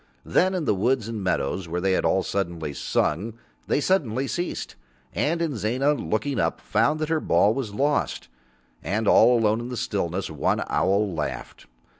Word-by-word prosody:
Then 185 Hz, +1 st, +2 dB
in 175 Hz, -4 st, -2 dB
the -, -, +3 dB
woods 115 Hz, +3 st, +1 dB
and 110 Hz, -3 st, -4 dB
meadows 90 Hz, 0 st, -1 dB
where 85 Hz, +2 st, -2 dB
they 95 Hz, +1 st, +1 dB
had 95 Hz, -, +1 dB
all 95 Hz, -, +2 dB
suddenly 85 Hz, -6 st, -3 dB
sung, 100 Hz, +10 st, -1 dB, 0.3 s
they -, -, +2 dB
suddenly 140 Hz, -, +1 dB
ceased. 175 Hz, +5 st, -4 dB, 0.4 s
And 165 Hz, +3 st, 0 dB
Inzana, 135 Hz, 0 st, 0 dB
looking 130 Hz, 0 st, -2 dB
up, -, -, 0 dB
found 155 Hz, +2 st, +1 dB
that 155 Hz, -, -1 dB
her 160 Hz, -1 st, +2 dB
ball 105 Hz, -7 st, +3 dB
was 115 Hz, -5 st, -4 dB
lost, 145 Hz, +5 st, 0 dB, 0.5 s
and 110 Hz, +2 st, -1 dB
all 120 Hz, +4 st, +6 dB
alone 110 Hz, -1 st, +2 dB
in 120 Hz, +1 st, -5 dB
the 125 Hz, -, -5 dB
stillness 95 Hz, -3 st, -2 dB
one 75 Hz, -, 0 dB
owl 100 Hz, 0 st, +1 dB
laughed. 75 Hz, -2 st, -5 dB
110 Hz, 170 wpm, -25 LUFS, 95-140 Hz, 0.5 s, all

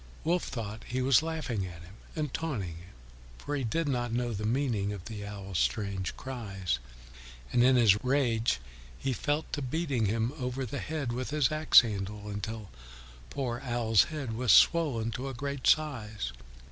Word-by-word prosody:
Wolf 175 Hz, +2 st, +1 dB
thought 110 Hz, -4 st, -5 dB
he 125 Hz, -, -2 dB
was 130 Hz, 0 st, +5 dB
laughing 155 Hz, -10 st, -2 dB
at 85 Hz, -2 st, -10 dB
him 90 Hz, +3 st, -13 dB, 0.2 s
and 150 Hz, -4 st, -2 dB
taunting 105 Hz, -, -3 dB
him, 85 Hz, +2 st, -13 dB, 0.5 s
for 145 Hz, -, -4 dB
he 135 Hz, -, -1 dB
did 150 Hz, +8 st, 0 dB
not 120 Hz, -4 st, 0 dB
know 120 Hz, 0 st, -1 dB
the 105 Hz, +1 st, -2 dB
meaning 115 Hz, -5 st, 0 dB
of 100 Hz, -4 st, -6 dB, 0.2 s
Owl's 100 Hz, -4 st, -4 dB
strange 95 Hz, -, -1 dB
cries, 95 Hz, -, -3 dB, 0.7 s
and 120 Hz, -, +5 dB
in 130 Hz, +1 st, +6 dB
his 105 Hz, -4 st, +5 dB
rage 120 Hz, -, +2 dB, 0.4 s
he 135 Hz, -1 st, -1 dB
fell 145 Hz, +5 st, 0 dB
to 145 Hz, -, -2 dB
beating 135 Hz, -4 st, 0 dB
him 115 Hz, +4 st, 0 dB
over 125 Hz, +1 st, -2 dB
the 140 Hz, +4 st, -4 dB
head 150 Hz, -6 st, -3 dB
with 125 Hz, +1 st, -3 dB
his 150 Hz, -2 st, +2 dB
axe 155 Hz, 0 st, +7 dB
handle 105 Hz, -2 st, -4 dB
until 105 Hz, +1 st, -5 dB, 0.6 s
poor 125 Hz, -4 st, -2 dB
Owl's 120 Hz, -4 st, +3 dB
head 145 Hz, -8 st, -4 dB
was 120 Hz, 0 st, +2 dB
swollen 135 Hz, -10 st, +5 dB
to 130 Hz, +4 st, -4 dB
a 135 Hz, -, -6 dB
great 140 Hz, +1 st, -3 dB
size. 110 Hz, -, +1 dB
120 Hz, 170 wpm, -30 LUFS, 105-140 Hz, 0.7 s, axe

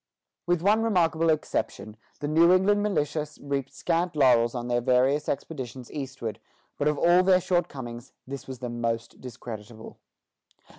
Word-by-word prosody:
With 175 Hz, -1 st, +1 dB
one 210 Hz, +3 st, +4 dB
remarkable 165 Hz, -7 st, +2 dB
exception, 145 Hz, -8 st, -2 dB, 0.3 s
the 145 Hz, -, -2 dB
New 165 Hz, +3 st, +5 dB
England 200 Hz, +3 st, +4 dB
militia 155 Hz, -6 st, -1 dB
reaped 140 Hz, -2 st, -3 dB
scant 170 Hz, 0 st, -1 dB
laurels 125 Hz, -4 st, +4 dB
on 120 Hz, 0 st, -3 dB
their 120 Hz, 0 st, +1 dB
various 130 Hz, +4 st, +2 dB
expeditions 130 Hz, -4 st, -5 dB
eastward; 130 Hz, -6 st, -5 dB, 0.4 s
but 145 Hz, -, +1 dB
of 150 Hz, -1 st, +1 dB
all 175 Hz, +4 st, +5 dB
their 185 Hz, 0 st, +4 dB
shortcomings, 135 Hz, -10 st, -3 dB
this 135 Hz, 0 st, -7 dB
was 130 Hz, -1 st, -6 dB
the 125 Hz, 0 st, -5 dB
most 115 Hz, -1 st, -3 dB
discreditable. 115 Hz, -3 st, -9 dB
140 Hz, 145 wpm, -26 LUFS, 120-170 Hz, 0.4 s, New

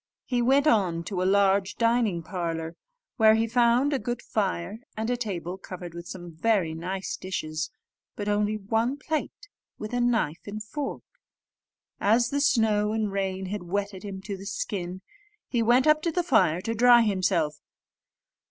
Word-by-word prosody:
He 245 Hz, -2 st, 0 dB
went 270 Hz, +4 st, +4 dB
on 185 Hz, -, +2 dB
to 185 Hz, 0 st, -3 dB
a -, -, +1 dB
large 200 Hz, 0 st, +3 dB
dining 230 Hz, -7 st, +1 dB
parlour, 165 Hz, -2 st, -4 dB, 0.4 s
where 220 Hz, -2 st, +6 dB
he 225 Hz, +1 st, +2 dB
found 240 Hz, +4 st, +3 dB
a 275 Hz, -, +1 dB
good 240 Hz, -2 st, -3 dB
fire, 195 Hz, -1 st, -2 dB, 0.2 s
and 220 Hz, +2 st, -1 dB
a -, -, +2 dB
table 190 Hz, -6 st, -4 dB
covered 180 Hz, -2 st, -8 dB
with 170 Hz, 0 st, -8 dB
some 175 Hz, -3 st, -8 dB
very 190 Hz, -3 st, +1 dB
nice 185 Hz, +4 st, -4 dB
dishes, 155 Hz, -4 st, -4 dB, 0.5 s
but 205 Hz, -, -5 dB
only 210 Hz, +1 st, +1 dB
one 225 Hz, +6 st, 0 dB
plate 315 Hz, +7 st, -4 dB, 0.3 s
with 215 Hz, +2 st, -6 dB
a 245 Hz, -, +1 dB
knife 230 Hz, -11 st, +1 dB
and 210 Hz, +1 st, -5 dB
fork. 280 Hz, +6 st, -5 dB, 1.0 s
As 235 Hz, +4 st, +3 dB
the 285 Hz, 0 st, 0 dB
snow 215 Hz, -5 st, +2 dB
and 215 Hz, -2 st, -1 dB
rain 190 Hz, -1 st, -2 dB
had 205 Hz, +2 st, -4 dB
wetted 200 Hz, +2 st, -3 dB
him 195 Hz, -1 st, -7 dB
to 200 Hz, 0 st, -4 dB
the 195 Hz, +1 st, -9 dB
skin, 185 Hz, -2 st, -4 dB, 0.4 s
he 240 Hz, -, 0 dB
went 240 Hz, +3 st, +4 dB
up 305 Hz, 0 st, +5 dB
to 335 Hz, -, 0 dB
the 355 Hz, +2 st, 0 dB
fire 190 Hz, -, +3 dB
to 225 Hz, +4 st, -2 dB
dry 240 Hz, +1 st, +6 dB
himself. 185 Hz, -7 st, +1 dB
205 Hz, 170 wpm, -27 LUFS, 185-235 Hz, 1.0 s, where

